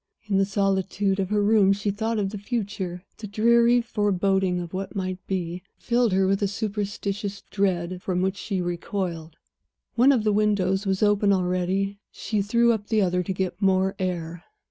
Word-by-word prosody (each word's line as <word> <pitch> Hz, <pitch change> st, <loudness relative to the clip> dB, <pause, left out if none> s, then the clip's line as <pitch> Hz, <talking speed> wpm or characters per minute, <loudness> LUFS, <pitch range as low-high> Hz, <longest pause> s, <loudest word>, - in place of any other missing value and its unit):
In 200 Hz, -2 st, +1 dB
the 195 Hz, -, +3 dB
solitude 195 Hz, 0 st, 0 dB
of 190 Hz, -1 st, -1 dB
her 210 Hz, -1 st, +1 dB
room 205 Hz, -2 st, +4 dB
she 205 Hz, +1 st, -1 dB
thought 220 Hz, +3 st, -2 dB
of 195 Hz, -2 st, -1 dB
the 210 Hz, -, -6 dB
future. 200 Hz, -5 st, -4 dB, 0.2 s
The 215 Hz, -, -6 dB
dreary 235 Hz, +3 st, +4 dB
foreboding 195 Hz, -4 st, 0 dB
of 175 Hz, 0 st, -7 dB
what 190 Hz, +1 st, -3 dB
it -, -, -17 dB
might 185 Hz, -1 st, -3 dB
be, 180 Hz, -2 st, -3 dB, 0.2 s
filled 240 Hz, -2 st, +1 dB
her 190 Hz, +1 st, +3 dB
with 195 Hz, +1 st, +1 dB
a 200 Hz, -, +2 dB
superstitious 200 Hz, -1 st, -3 dB
dread 185 Hz, -2 st, -1 dB
from 180 Hz, -1 st, -1 dB
which 190 Hz, +1 st, 0 dB
she 195 Hz, -3 st, -3 dB
recoiled. 175 Hz, -2 st, -4 dB, 0.6 s
One 250 Hz, +4 st, +5 dB
of 245 Hz, -6 st, +2 dB
the 210 Hz, -1 st, +2 dB
windows 200 Hz, -2 st, +1 dB
was 190 Hz, +1 st, +1 dB
open 205 Hz, -1 st, +3 dB
already; 185 Hz, +2 st, 0 dB
she 215 Hz, -2 st, -2 dB
threw 235 Hz, +4 st, +3 dB
up 210 Hz, -2 st, -2 dB
the 215 Hz, -2 st, +2 dB
other 180 Hz, -1 st, +1 dB
to 180 Hz, -, -4 dB
get 185 Hz, 0 st, -3 dB
more 190 Hz, 0 st, +2 dB
air. 175 Hz, -2 st, -3 dB
195 Hz, 185 wpm, -25 LUFS, 185-210 Hz, 0.6 s, One